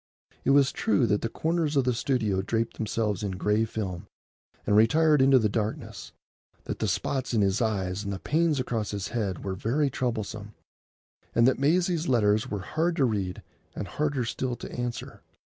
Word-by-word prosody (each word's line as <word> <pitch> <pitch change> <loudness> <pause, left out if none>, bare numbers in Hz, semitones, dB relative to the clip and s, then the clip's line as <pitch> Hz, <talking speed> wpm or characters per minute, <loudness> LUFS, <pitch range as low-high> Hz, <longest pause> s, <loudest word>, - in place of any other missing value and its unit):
It - - 0
was 140 0 +5
true 105 -7 +1
that 105 +1 +1
the 115 - -2
corners 160 +2 -1
of 135 - +4
the 125 0 +1
studio 115 -6 0
draped 115 +3 -2
themselves 105 -2 -1
in 100 -2 -2
gray 105 +4 +1
film 95 -6 -5 0.6
and 105 - +2
retired 150 +7 +5
into 135 0 +6
the 110 -4 +3
darkness, 105 +1 -4 0.5
that - - -5
the - - 0
spots 130 -3 -1
in 110 - +3
his 100 +3 +1
eyes 100 -3 -1
and 100 - -3
the 95 - -3
pains 155 - +1
across 115 -4 -2
his 100 -1 -4
head 105 -6 -2
were 95 - -2
very 130 +9 0
troublesome, 110 -4 -3 0.8
and 115 +1 +5
that 130 - +2
Maisie's 170 +3 +2
letters 110 -4 +2
were 100 -2 -3
hard 165 - -1
to 140 - +3
read 100 -6 -2 0.3
and 100 - -4
harder 145 -2 -1
still 125 +2 -2
to - - -9
answer. 120 -1 -5
115 Hz, 180 wpm, -27 LUFS, 105-135 Hz, 0.8 s, into